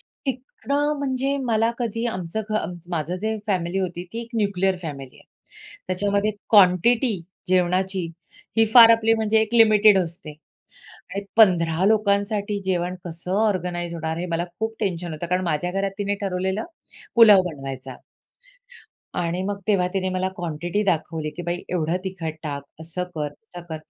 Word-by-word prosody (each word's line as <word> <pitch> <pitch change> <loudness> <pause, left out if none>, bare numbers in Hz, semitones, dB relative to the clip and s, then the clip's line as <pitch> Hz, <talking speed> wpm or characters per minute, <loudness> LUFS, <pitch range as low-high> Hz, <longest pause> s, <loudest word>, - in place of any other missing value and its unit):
शिकण 265 +1 -7 0.3
म्हणजे 275 0 -1
मला 225 -1 +2
कधी 230 -1 -2
आमचं 185 -2 -3
घ - - -1
आमच 175 -3 -4
माझं 170 +1 -2
जे 220 0 0
फॅमिली 185 -2 -1
होती 175 -2 -3
ती 230 - -3
एक 235 - -11
न्यूक्लिअर 195 -3 +1
फॅमिली 140 -5 -7
आहे. - - -19 0.6
त्याच्यामध्ये 200 +3 0 0.2
क्वांटिटी 215 +4 +5 0.3
जेवणाची 185 0 +1 0.5
ही 225 - +6
फार 230 -2 +10
आपली 225 0 +4
म्हणजे 220 0 +2
एक 220 +1 -4
लिमिटेड 215 -3 +6
असते 170 -3 -4 0.8
आणि 200 0 -3
15 175 -5 +4
लोकांसाठी 205 -1 +1
जेवण 180 -1 -1
कसं 175 +1 -6
ऑर्गनाइज 175 -3 -2
होणार, 160 -1 -3
हे 175 - -3
मला 170 0 -1
खूप 220 0 -2
टेन्शन 175 -5 -2
होतं, 155 +2 -5
कारण 180 +2 0
माझ्या 170 +1 -1
घरात 195 +1 -1
तिने 205 0 0
ठरवलेलं 190 +2 -1 0.5
पुलाव 210 -5 +8
बनवायचा. 135 -3 -7 1.2
आणि 175 +1 -1
मग 200 0 -3
तेव्हा 195 -4 +3
तिने 185 -1 0
मला 185 0 -1
क्वांटिटी 175 +3 -2
दाखवली 160 -4 -1
की, 175 - -5
"बाई 175 0 -2
एवढं 170 -1 0
तिखट 175 -4 -4
टाक, 145 -3 -4 0.2
असं 170 +3 -4
कर, 150 -2 -2
तसं 175 +1 -12
कर", 160 - -4
185 Hz, 155 wpm, -23 LUFS, 170-215 Hz, 1.2 s, फार